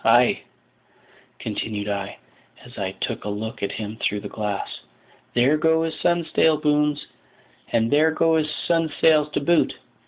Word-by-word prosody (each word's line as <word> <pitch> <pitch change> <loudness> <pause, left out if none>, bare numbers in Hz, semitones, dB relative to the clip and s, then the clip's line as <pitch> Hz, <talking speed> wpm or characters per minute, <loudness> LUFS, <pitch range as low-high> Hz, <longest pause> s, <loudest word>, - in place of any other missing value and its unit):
Ay," 120 +2 +4 1.0
continued 105 -2 -4
I, 100 -1 -3 0.5
as - - -14
I - - -3
took - - -3
a 105 - -4
look 110 +2 -5
at 100 - -2
him 110 0 -5
through 105 0 0
the 100 - -6
glass, 105 -2 -4 0.6
"there 130 +5 +4
go 160 +1 +3
his 165 -1 -2
stunsail 165 -2 +2
booms, 150 0 +1 0.7
and 115 0 +1
there 155 +2 +5
go 160 0 +2
his 155 -1 +1
stunsails 160 -2 +2
to - - +1
boot. 170 +3 +2
150 Hz, 150 wpm, -23 LUFS, 110-160 Hz, 1.0 s, there